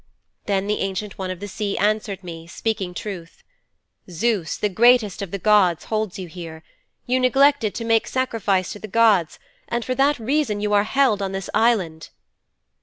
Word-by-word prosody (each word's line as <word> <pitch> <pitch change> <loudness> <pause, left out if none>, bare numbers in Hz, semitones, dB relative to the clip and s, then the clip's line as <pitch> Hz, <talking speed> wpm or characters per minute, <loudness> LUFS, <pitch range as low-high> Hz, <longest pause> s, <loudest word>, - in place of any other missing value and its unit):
"' - - -50
'Then 195 -1 0
the 210 +1 -1
Ancient 195 +1 -4
One 190 -1 -3
of 185 -1 -5
the 205 - -6
Sea 205 0 -3
answered 205 -2 0
me, 165 -2 -9
speaking 190 -1 -3
truth, 180 -5 -7 0.7
"Zeus, 185 -1 -1
the 210 - 0
greatest 220 0 +3
of 200 - -4
all - - -21
the - - -1
gods 195 -4 +3
holds 215 -3 -2
you 185 -2 -6
here. 160 -1 -9 0.4
You 255 +1 +1
neglected 265 -3 +3
to 230 - -4
make 225 -1 +2
sacrifice 220 -8 0
to 210 - -10
the 215 - -8
gods 210 -6 +3 0.3
and 235 -1 -2
for 255 - -1
that 280 +3 +2
reason 245 -2 0
you 210 0 -1
are 205 0 +4
held 260 -6 +2
on 195 -1 -3
this 195 -1 -5
island." 205 -8 +1
210 Hz, 185 wpm, -22 LUFS, 185-230 Hz, 0.7 s, are